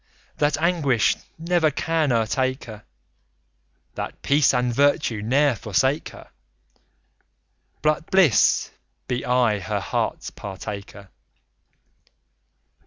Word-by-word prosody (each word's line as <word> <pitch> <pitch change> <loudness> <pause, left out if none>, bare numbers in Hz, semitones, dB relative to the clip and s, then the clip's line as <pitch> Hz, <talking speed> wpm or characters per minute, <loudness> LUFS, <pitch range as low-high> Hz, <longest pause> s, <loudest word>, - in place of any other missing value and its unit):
That 145 -1 +2
anguish 155 -8 +2 0.2
never 165 -1 +1
can 160 0 0
o'ertake 130 +3 0
her; 105 -3 -11 1.1
That - - -6
peace 140 0 +4
and 125 -1 0
virtue 140 -5 +1
ne'er 135 +5 +2
forsake 130 - 0
her, - - -14 1.5
But 155 +1 0
bliss 180 - +3 0.4
be 125 0 -2
aye 125 -4 +2
her 95 - -3
heart's - - -3
partaker! 100 0 -8
130 Hz, 95 wpm, -23 LUFS, 110-150 Hz, 1.5 s, peace